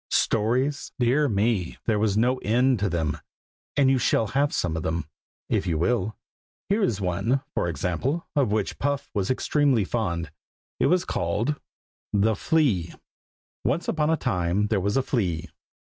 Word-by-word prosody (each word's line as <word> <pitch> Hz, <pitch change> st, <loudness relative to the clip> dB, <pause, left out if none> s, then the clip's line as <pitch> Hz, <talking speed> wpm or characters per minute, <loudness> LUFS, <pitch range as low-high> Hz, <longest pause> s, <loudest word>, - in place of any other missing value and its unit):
Stories? 125 Hz, +6 st, +1 dB
dear 135 Hz, +4 st, +2 dB
me, 100 Hz, -4 st, 0 dB
there 110 Hz, -2 st, +2 dB
was 105 Hz, -1 st, +1 dB
no 125 Hz, +3 st, +3 dB
end 125 Hz, +2 st, +2 dB
to 100 Hz, 0 st, +1 dB
them; 80 Hz, -4 st, -1 dB, 0.6 s
and 135 Hz, -2 st, +5 dB
you 130 Hz, -, +3 dB
shall 115 Hz, -, +2 dB
have 140 Hz, +7 st, +1 dB
some 80 Hz, -3 st, -1 dB
of 80 Hz, -, -2 dB
them, 80 Hz, +1 st, -2 dB, 0.4 s
if 100 Hz, -3 st, 0 dB
you 80 Hz, -2 st, +1 dB
will. 105 Hz, +4 st, 0 dB, 0.5 s
Here 205 Hz, +3 st, +2 dB
is 115 Hz, -, +1 dB
one, 100 Hz, +8 st, 0 dB
for -, -, 0 dB
example, 105 Hz, -, -2 dB
of 135 Hz, -7 st, +2 dB
which 105 Hz, -2 st, -1 dB
Puff 140 Hz, 0 st, -1 dB
was 100 Hz, -3 st, -1 dB
extremely 130 Hz, -2 st, +2 dB
fond. 85 Hz, -8 st, -2 dB, 0.5 s
It -, -, +3 dB
was 180 Hz, 0 st, +2 dB
called 105 Hz, -, -1 dB, 0.5 s
THE 105 Hz, +2 st, +3 dB
FLEA. 110 Hz, -, +1 dB, 0.7 s
Once 145 Hz, +9 st, 0 dB
upon 155 Hz, -1 st, +1 dB
a 160 Hz, -, +3 dB
time 90 Hz, -, 0 dB
there 105 Hz, -3 st, +1 dB
was 100 Hz, +6 st, 0 dB
a 135 Hz, -, +2 dB
flea. 90 Hz, -, -1 dB
110 Hz, 165 wpm, -25 LUFS, 90-135 Hz, 0.7 s, and